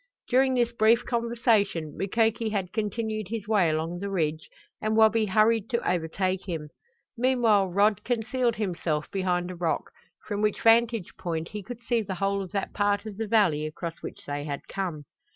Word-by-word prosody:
During 260 +1 +3
this 240 -1 +1
brief 230 +1 +4
conversation 230 - +1
Mukoki 225 +3 +1
had 195 -4 -3
continued 215 -1 -2
his 215 0 -5
way 205 -6 +3
along 160 +3 -2
the 200 +1 -4
ridge 155 -5 -1 0.3
and 215 +1 0
Wabi 220 0 +5
hurried 215 +1 +3
to 235 -2 -1
overtake 185 +3 -1
him. 155 -3 -4 0.5
Meanwhile 235 -5 +3
Rod 200 +2 +2
concealed 240 0 0
himself 170 -7 -2
behind 180 -2 -1
a - - -7
rock, 170 -2 -2 0.3
from 205 -1 -3
which 210 -1 0
vantage 230 -3 +4
point 165 -2 -3
he 210 -1 -6
could 240 +4 -9
see 235 -1 +1
the 195 -3 -4
whole 195 +2 0
of 185 - -7
that 200 -2 -3
part 205 0 +1
of 210 -3 -7
the 225 0 -3
valley 195 -9 +3
across 165 +2 -6
which - - -8
they 145 0 -3
had 145 -1 -5
come. 175 -7 -4
205 Hz, 175 wpm, -27 LUFS, 180-225 Hz, 0.5 s, Wabi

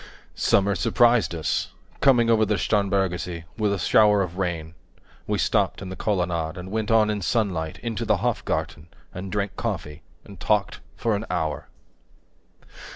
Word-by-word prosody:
Summer 100 +1 +2
surprised 120 -4 +3
us, 80 - -2 0.3
coming 120 -4 +4
over 110 -1 +4
the 105 -1 +1
Starnbergersee 95 -5 0
With 105 -2 0
a 100 - 0
shower 105 0 +4
of 90 0 -6
rain; 85 -3 -3 0.5
we - - 0
stopped - - +1
in 95 - -7
the 95 - -6
colonnade, 90 -6 -1
And 90 +1 -7
went 110 0 -2
on 110 -1 +4
in 105 -1 -3
sunlight, 90 -7 -1
into 115 -3 -3
the - - +2
Hofgarten, 75 +2 -2 0.3
10 95 - -6
And 95 - -7
drank 100 -2 -2
coffee, 75 +1 -4 0.2
and - - -13
talked - - 0 0.2
for 115 -2 0
an 105 +3 -4
hour. 80 -5 -2
100 Hz, 155 wpm, -24 LUFS, 85-105 Hz, 0.5 s, coming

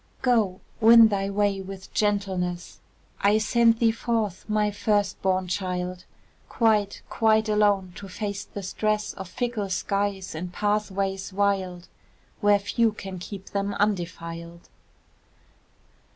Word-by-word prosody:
Go! 220 -7 +2 0.2
win 225 0 +8
thy 195 -1 -1
way 200 -1 0
with 190 0 -10
gentleness: 190 -4 -1 0.4
I 205 +2 +4
send 230 +1 +3
thee 230 -1 +3
forth, 225 -4 -2
my 210 -1 +1
first 205 0 0
born 185 -1 +1
child, 180 -1 -3 0.4
Quite, 215 -3 +1
quite 220 -1 +2
alone, 205 -3 +2
to 200 - -8
face 200 +1 -4
the 200 -1 -8
stress 210 +2 -1
Of 190 -2 -8
fickle 230 -3 -2
skies 195 0 -2
and 175 +3 -5
pathways 200 -1 -1
wild, 190 -3 -1 0.5
Where 205 -1 +5
few 225 +2 +1
can 190 -3 -7
keep 195 +1 -9
them 200 0 -2
undefiled. 170 -4 -3
200 Hz, 125 wpm, -25 LUFS, 185-210 Hz, 0.5 s, win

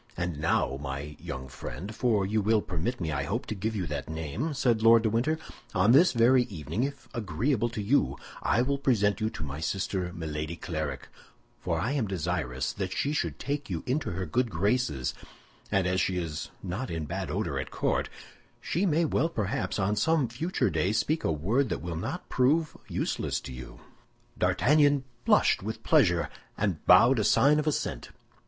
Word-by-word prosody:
"And 85 -4 -2
now, 80 -4 +1
my 70 +2 -5
young 65 +1 -6
friend, 65 - -7
for 110 -6 +2
you 105 +2 +1
will 110 +1 +2
permit 95 +8 -3
me, 80 -3 -2
I 70 -2 -1
hope, 100 - -2
to - - -3
give 110 +2 -3
you 95 -4 -1
that 75 -2 -4
name," 80 - -3
said 120 -4 +2
Lord 115 0 +6
de 110 - +1
Winter, 130 +8 +1 0.4
"on 95 +5 +4
this 160 +8 +7
very 125 +1 +4
evening, 80 - -4
if 140 +1 -3
agreeable 120 - 0
to 110 -3 -4
you, 135 +8 +2 0.2
I 120 - +2
will 140 +2 -1
present 110 -6 +2
you 110 - +1
to 80 - -7
my 70 0 -5
sister, 95 +1 -2
Milady 80 -1 -4
Clarik, 80 -5 -4 0.5
for - - -1
I 120 - -1
am 135 -7 0
desirous 70 -7 -2
that 95 -2 -4
she 145 - 0
should 155 - -1
take 140 -1 -3
you - - -3
into 135 +4 -1
her 95 +2 -3
good 120 +9 0
graces; 100 - 0 0.6
and 95 -2 +2
as 90 +1 +1
she 95 - 0
is 80 -3 -4
not 95 +8 -4
in 80 -2 -3
bad - - -4
odor - - -2
at - - -4
court, - - 0 0.5
she 185 +5 0
may 165 0 +2
perhaps 140 - -1
on 100 +1 +1
some 160 +3 +2
future 130 - -1
day 85 +6 +1
speak 155 +8 0
a - - +1
word 110 - +1
that - - -3
will 85 -1 -4
not 80 - -4
prove 150 +5 +2
useless - - -1
to 65 - -8
you." 65 -1 -10 0.5
D'Artagnan 145 -1 +3 0.2
blushed - - +4
with 110 +3 -5
pleasure, 90 - +3 0.3
and 100 -6 -1
bowed 120 +7 +7
a - - +2
sign 145 +8 +4
of 150 - -2
assent. 150 - -2
105 Hz, 185 wpm, -28 LUFS, 80-130 Hz, 0.6 s, this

